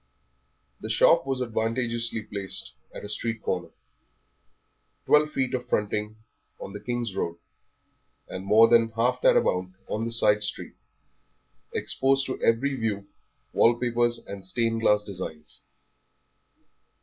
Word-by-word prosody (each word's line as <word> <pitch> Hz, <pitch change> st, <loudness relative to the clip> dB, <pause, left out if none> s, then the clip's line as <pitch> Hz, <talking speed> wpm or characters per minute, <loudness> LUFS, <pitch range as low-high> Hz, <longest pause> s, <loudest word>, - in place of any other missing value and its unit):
The -, -, -7 dB
shop 165 Hz, -4 st, +4 dB
was 135 Hz, -1 st, -1 dB
advantageously 115 Hz, 0 st, -1 dB
placed 100 Hz, -, -2 dB, 0.2 s
at -, -, -9 dB
a -, -, -5 dB
street 115 Hz, +1 st, -3 dB
corner. 90 Hz, -2 st, -2 dB, 1.4 s
Twelve 150 Hz, 0 st, +4 dB
feet 130 Hz, -4 st, -2 dB
of 125 Hz, -1 st, -3 dB
fronting 105 Hz, +1 st, -1 dB, 0.4 s
on 100 Hz, -, -8 dB
the 105 Hz, -, -6 dB
King's 120 Hz, -1 st, -3 dB
Road, 85 Hz, -2 st, -2 dB, 0.9 s
and 95 Hz, -, -6 dB
more 110 Hz, +3 st, +6 dB
than 115 Hz, -1 st, +4 dB
half 125 Hz, +3 st, +1 dB
that -, -, +5 dB
amount 90 Hz, 0 st, 0 dB
on 110 Hz, +2 st, -2 dB
the 115 Hz, -, -3 dB
side 105 Hz, -2 st, +3 dB
street, 105 Hz, -, -4 dB, 1.0 s
exposed 135 Hz, +1 st, +1 dB
to 130 Hz, -, -5 dB
every 125 Hz, +5 st, +2 dB
view 105 Hz, -5 st, -3 dB, 0.4 s
wall 115 Hz, +1 st, +5 dB
papers 120 Hz, 0 st, +1 dB
and 100 Hz, -1 st, -8 dB
stained 115 Hz, +4 st, -1 dB
glass 105 Hz, -1 st, +3 dB
designs. 90 Hz, -6 st, -7 dB
115 Hz, 130 wpm, -26 LUFS, 105-120 Hz, 1.4 s, more